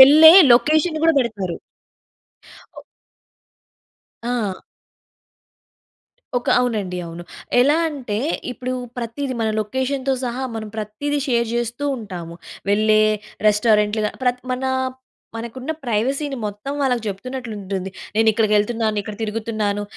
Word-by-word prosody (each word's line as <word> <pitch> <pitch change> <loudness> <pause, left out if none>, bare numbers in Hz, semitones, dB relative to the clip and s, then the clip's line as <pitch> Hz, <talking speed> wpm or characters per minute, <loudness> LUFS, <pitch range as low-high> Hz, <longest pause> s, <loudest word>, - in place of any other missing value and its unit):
వెళ్ళే 305 +4 +10 0.2
లొకేషన్ 310 +6 +3
గూడా 325 -1 +5
పెడతారు. 200 -8 -3 1.2
ఓహ్! - - -10 1.4
ఆ! 235 -6 -2 1.8
ఒక 245 - -8
అవునండి. 205 -7 -1
అవును. 170 +1 -8 0.4
ఎలా 290 +5 +4
అంటే, 250 -9 -4 0.3
ఇప్పుడూ 255 +1 -4 0.3
ప్రతీది 250 +3 -3
మన 220 - +1
లొకేషన్‌తో 260 +4 -1
సహా, 250 +2 -3
మనం 215 -1 -5
ప్రత్తీది 220 +8 -2
షేర్ 235 -2 +1
చేస్తూ 240 +4 -2
ఉంటాము. 180 -7 -7 0.4
వెళ్ళే 215 +1 +4 0.5
రెస్టారెంట్‌లు 210 0 +3
గా - - -2
ప్రత్ 250 0 +1
మనా 260 +1 -1 0.7
మనకున్న 240 +5 -6
ప్రైవసీని 270 +5 -1
మొత్తం 210 +7 -4
వాళ్ళకు 250 -4 +1
చెప్తున్నట్లుంటుంది. 200 -4 -5 0.2
నేను 220 0 +4
ఇక్కడికెళ్తున్నాను, 215 0 +1
ఇక్కడ 210 0 -7
తిరుగుతున్నాను. 215 -1 -2
230 Hz, 105 wpm, -21 LUFS, 210-260 Hz, 1.8 s, వెళ్ళే